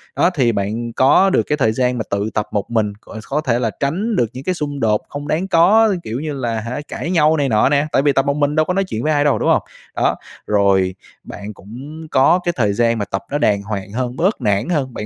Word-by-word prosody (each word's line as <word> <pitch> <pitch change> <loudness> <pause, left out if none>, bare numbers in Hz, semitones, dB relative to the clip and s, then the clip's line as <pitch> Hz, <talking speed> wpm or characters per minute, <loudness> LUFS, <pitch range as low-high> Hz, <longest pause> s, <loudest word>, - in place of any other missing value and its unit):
Đó - - +3
thì 125 -6 +2
bạn 110 +3 -3
có 135 +11 +4
được 190 - +2
cái 150 - 0
thời 110 -6 +2
gian 125 +2 0
mà 110 - -2
tự 100 +2 -1
tập 105 - -1
một 105 - -2
mình, 110 -3 0
c 110 +1 -11
có 150 +2 0
thể 125 -5 0
là 115 -3 -1
tránh 190 +11 -1
được 120 - +2
những 130 - -8
cái 185 +4 -1
xung 145 -3 -4
đột 105 -1 +2
không 145 0 -6
đáng 165 +6 -1
có, 195 +5 +4
kiểu 115 +3 -4
như 150 0 -4
là, 120 -5 -2
hả 120 +6 -5
cãi 170 - -4
nhau 160 -3 +3
này 140 -2 0
nọ 110 +2 +3
nè. 145 +1 +2
Tại - - +3
vì 145 0 +3
tập 135 - +2
một 140 0 0
mình 145 0 +1
đâu 155 0 +3
có 180 - -1
nói 195 +1 +1
chuyện 120 - -5
với 155 - +1
ai 145 -1 +2
đâu, 145 -2 +2
đúng - - +1
hông? - - +3 0.3
Đó, - - +1 0.3
rồi 100 -3 +2 0.3
bạn 105 +1 -8
cũng 135 +11 -10
có 135 +7 +4
cái 175 - +2
thời 105 -5 +1
gian 115 +2 +1
mà 105 - -2
tập 95 0 -3
nó 145 - 0
đàng 105 -8 +2
hoàng 100 -1 -5
hơn, 125 +2 -3
bớt 185 -1 0
nản 105 - 0
hơn, 140 -7 -1
bạn 105 - -5
130 Hz, 265 wpm, -18 LUFS, 110-150 Hz, 0.3 s, có